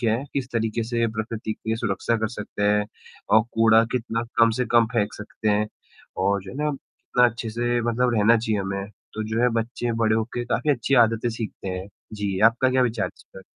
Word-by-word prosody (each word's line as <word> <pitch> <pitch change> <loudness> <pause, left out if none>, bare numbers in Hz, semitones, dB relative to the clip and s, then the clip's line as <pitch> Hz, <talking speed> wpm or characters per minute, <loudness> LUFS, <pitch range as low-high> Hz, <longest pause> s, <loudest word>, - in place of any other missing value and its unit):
क्या 115 -3 +2
है 130 - -5
किस 135 -2 -2
तरीके 115 0 -1
से 115 0 0
प्रकृति 110 0 -3
की 110 +1 -3
सुरक्षा 115 +1 -1
कर 110 0 -1
सकते 105 -2 -6
हैं 105 0 +2 0.4
और 110 - +6
कूड़ा 115 0 +5
कितना 115 -2 -1 0.2
कम 115 0 +6
से 125 - +1
कम 120 -1 +6
फेंक 110 -3 0
सकते 105 +1 -5
हैं 105 +1 +2 0.6
और 100 0 +1
जो 95 - -9
है - - -9
ना 150 0 +1
कितना 125 -2 -1
अच्छे 115 -1 -6
से 120 +2 0
मतलब 120 +1 +1
रहना 110 +2 +5
चाहिए 110 -2 -1
हमें, 100 +1 -4 0.2
तो 110 - -3
जो 110 +1 -1
है 125 - +5
बच्चे 120 +1 -3
बड़े 110 0 +3
हो 110 - +1
के 120 - -2
काफ़ी 150 - 0
अच्छी 135 0 +1
आदतें 115 +1 -2
सीखते 110 -3 -6
हैं। 95 +1 -5 0.3
जी, 100 -2 -2
आपका 115 +4 +4
क्या 130 0 +3
विचार 115 -4 0
है - - -7
इस - - -18
पर? 95 - -10
115 Hz, 220 wpm, -24 LUFS, 105-120 Hz, 0.6 s, और